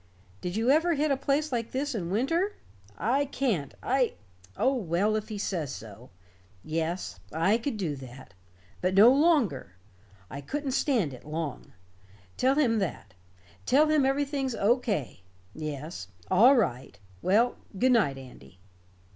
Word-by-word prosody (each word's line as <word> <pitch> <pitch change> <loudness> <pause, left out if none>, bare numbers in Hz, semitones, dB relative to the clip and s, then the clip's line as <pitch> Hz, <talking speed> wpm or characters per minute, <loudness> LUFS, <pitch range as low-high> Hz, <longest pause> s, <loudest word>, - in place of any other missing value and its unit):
Did 180 +1 -4
you 230 +4 +2
ever 325 +3 +3
hit 300 +1 +1
a - - +3
place 280 +3 0
like 235 -2 -2
this 285 +2 -2
in 180 -7 -3
winter? 330 - 0 0.4
I 260 +8 +1
can't 235 - -2
I 255 -1 +1 0.4
oh, 265 - +2
well, 205 -2 0
if 215 0 -3
he 215 - -5
says 170 -8 -2
so. 110 +3 -10 0.5
Yes. 165 - -3
I 185 +8 +2
could 235 -1 -3
do 170 -8 -2
that. 130 -4 -12 0.5
But 185 +1 0
no 220 +6 +8
longer. 265 - +2 0.5
I 140 +8 -7
couldn't 280 - -3
stand 240 - +1
it 125 - -11
long. 155 -2 -5 0.6
Tell 265 +2 +2
him 240 -7 +2
that. 160 - -4 0.5
Tell 300 +3 +4
him 305 -2 +3
everything's 270 -1 0
O. 220 +4 +3
K. 175 - -3 0.3
Yes. 155 +1 -6 0.2
All 235 +9 +7
right. 130 - -1 0.2
Well, 225 +6 +2 0.2
good 255 +5 +3
night, 190 - +3
Andy." 110 - -13
220 Hz, 145 wpm, -28 LUFS, -, 0.6 s, no